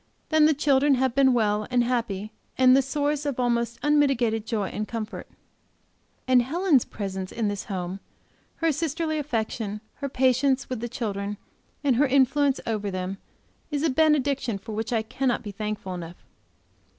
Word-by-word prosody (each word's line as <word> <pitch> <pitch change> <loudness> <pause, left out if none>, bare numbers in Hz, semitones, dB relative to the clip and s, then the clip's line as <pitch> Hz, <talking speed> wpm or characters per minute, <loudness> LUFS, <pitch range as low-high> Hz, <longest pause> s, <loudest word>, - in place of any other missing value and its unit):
Then 315 -1 +5
the 310 - +3
children 280 0 +3
have 260 -1 +1
been 270 0 +5
well 215 -3 +1
and 250 -1 +3
happy, 225 -4 -2 0.3
and 255 0 +6
the 270 - +5
source 290 +2 -1
of 285 -4 -3
almost 235 -1 0
unmitigated 265 -7 +2
joy 210 -3 -1
and 215 0 -4
comfort. 225 -2 -5 1.0
And 255 -1 +5
Helen's 310 +1 +2
presence 190 -2 -5
in 225 -3 -1
this 205 -1 -4
home, 185 -2 -4 0.6
her 330 -1 +1
sisterly 315 +1 -1
affection, 220 -6 -3 0.2
her 280 - -4
patience 260 +1 +2
with 250 - -2
the 240 +1 -4
children 205 -4 -3 0.5
and 265 -5 +3
her 290 +2 +4
influence 275 +1 +3
over 210 -3 -2
them, 185 +1 -4 0.5
is 295 -1 -2
a 320 - +2
benediction 280 -6 +2
for 220 +3 -9
which 220 +2 -3
I 225 -2 +1
cannot 245 +2 -1
be 205 - -6
thankful 210 -2 -4
enough. 175 -1 -7
245 Hz, 165 wpm, -25 LUFS, 215-280 Hz, 1.0 s, and